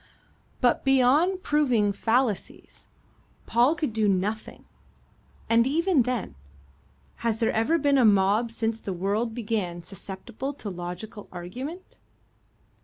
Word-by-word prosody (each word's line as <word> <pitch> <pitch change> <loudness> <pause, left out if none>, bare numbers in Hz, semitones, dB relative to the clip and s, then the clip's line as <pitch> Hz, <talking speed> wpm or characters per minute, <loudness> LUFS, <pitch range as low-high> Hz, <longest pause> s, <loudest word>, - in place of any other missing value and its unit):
But 245 -2 +2
beyond 275 +8 +3
proving 250 -9 +2
fallacies, 225 0 -2 0.6
Paul 245 +7 +3
could 305 -9 -2
do 215 -1 +2
nothing 200 +3 -2 0.8
and 230 +1 +4
even 330 +1 +2
then, 245 - -2 0.8
has 230 -1 -1
there 225 - +2
ever 225 +10 +2
been 285 -3 +3
a - - +5
mob 205 +2 +4
since 225 0 -2
the 195 - -4
world 205 +6 -1
began 205 -7 -3
susceptible 205 +9 -7
to 220 -7 -6
logical 180 +4 -7
argument? 255 - -8
230 Hz, 115 wpm, -26 LUFS, 205-265 Hz, 0.8 s, a